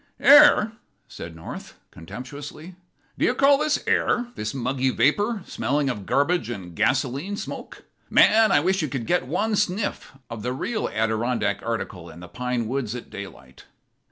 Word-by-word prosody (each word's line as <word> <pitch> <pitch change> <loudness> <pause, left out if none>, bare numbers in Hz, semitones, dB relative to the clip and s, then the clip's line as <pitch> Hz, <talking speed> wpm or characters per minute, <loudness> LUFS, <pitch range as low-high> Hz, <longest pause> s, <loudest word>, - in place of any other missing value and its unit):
"Air!" 285 -7 +7 0.4
said 85 -1 -9
North, 80 - -9 0.2
contemptuously. 145 - -9 0.5
"Do - - +2
you 250 - +1
call 275 +1 +5
this 305 0 0
air? 245 0 +1
this 110 0 -4
muggy 130 0 -1
vapor, 205 - +1
smelling 140 -1 -1
of 105 -5 -8
garbage 165 +2 +1
and 90 -7 -7
gasoline 140 - 0
smoke. - - -8 0.3
Man, 220 0 +5
I 145 - +4
wish 190 +3 +1
you 155 - -1
could 130 -4 -4
get 175 -4 0
one 210 +9 0
sniff 205 -4 -2
of 115 -2 -7
the 125 +3 -2
real 215 - -2
Adirondack 110 -1 -1
article 100 -7 -5
in 85 - -12
the 90 - -10
pine 125 +3 -3
woods 125 -2 -3
at 125 - -9
daylight." 65 -10 -11
135 Hz, 155 wpm, -24 LUFS, -, 0.5 s, Air